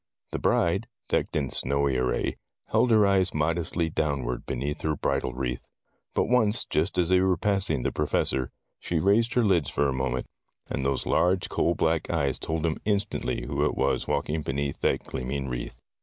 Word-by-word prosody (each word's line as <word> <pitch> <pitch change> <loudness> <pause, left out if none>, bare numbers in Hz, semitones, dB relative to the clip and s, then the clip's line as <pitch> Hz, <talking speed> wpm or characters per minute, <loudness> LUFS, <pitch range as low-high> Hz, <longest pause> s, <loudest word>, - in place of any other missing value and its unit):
The - - -2
bride, 95 +7 +1 0.2
decked - - 0
in 70 -4 0
snowy 70 0 +1
array, 65 0 0 0.3
held 115 +3 +3
her 110 -3 +5
eyes 95 -3 +2
modestly 85 +2 0
downward 70 -6 -2
beneath 70 +4 -3
her 80 -1 0
bridal 65 - -1
wreath. 60 -1 -3 0.5
But - - +3
once, 115 -2 +3
just 80 +5 -1
as 90 -1 +2
they 90 0 +5
were 95 -2 +2
passing 95 -10 0
the - - 0
Professor, 65 -3 0 0.3
she 85 - -2
raised 105 +8 +3
her 125 - +4
lids 90 -8 +2
for 75 - +1
a 70 - 0
moment, 65 -1 -1 0.4
and 70 - -3
those 70 0 0
large 90 0 +2
coal 85 - +1
black 80 0 0
eyes 70 -2 0
told 80 0 -2
him 80 -2 0
instantly 100 - -1
who - - -1
it - - +1
was 70 +1 0
walking 75 +2 -1
beneath 70 0 -2
that - - +1
gleaming 70 +2 -4
wreath. - - -5
80 Hz, 180 wpm, -27 LUFS, 70-95 Hz, 0.5 s, her